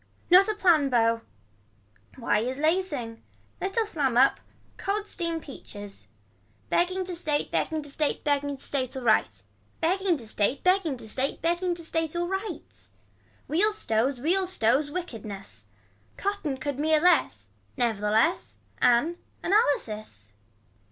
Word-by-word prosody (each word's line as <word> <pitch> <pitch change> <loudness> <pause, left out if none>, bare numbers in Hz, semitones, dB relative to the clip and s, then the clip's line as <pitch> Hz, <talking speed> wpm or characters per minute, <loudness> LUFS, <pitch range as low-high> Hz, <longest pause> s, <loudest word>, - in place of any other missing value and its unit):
Not 375 +3 +8
a 430 - 0
plan 335 -8 +4
bow. 230 -2 +2 0.9
Why 230 -4 +1
is 255 +4 -2
lacings. 300 -8 -1 0.4
Little 390 +4 0
slam 285 - 0
up. 265 +2 +5 0.4
Cold 410 +1 -2
seam 335 -4 -3
peaches. 205 -9 -11 0.6
Begging 370 +2 +1
to 365 - -5
state 305 -4 -1
begging 315 -1 -1
to 290 - -10
state 300 +1 -1
begging 285 -1 0
to - - -13
state 260 -2 -2
alright. 215 - +1 0.4
Begging 365 +1 +1
to 240 - -11
state 215 +4 0
begging 365 -7 +2
to 225 - -11
state 260 +5 -2
begging 345 +1 +1
to 340 - -11
state 325 0 -2
alright. 385 +3 -4 0.6
Wheels 415 +7 +2
stows 245 - 0
wheels 365 +6 +1
stows. 265 +1 +2
Wickedness. 225 - -7 0.5
Cotton 395 -9 -2
could 285 0 -4
mere 310 +1 +3
less. 355 +3 +2 0.3
Nevertheless. 225 - +1 0.2
Anne. 265 +8 +3 0.3
Analysis. 215 - 0
295 Hz, 130 wpm, -27 LUFS, 240-360 Hz, 0.9 s, Not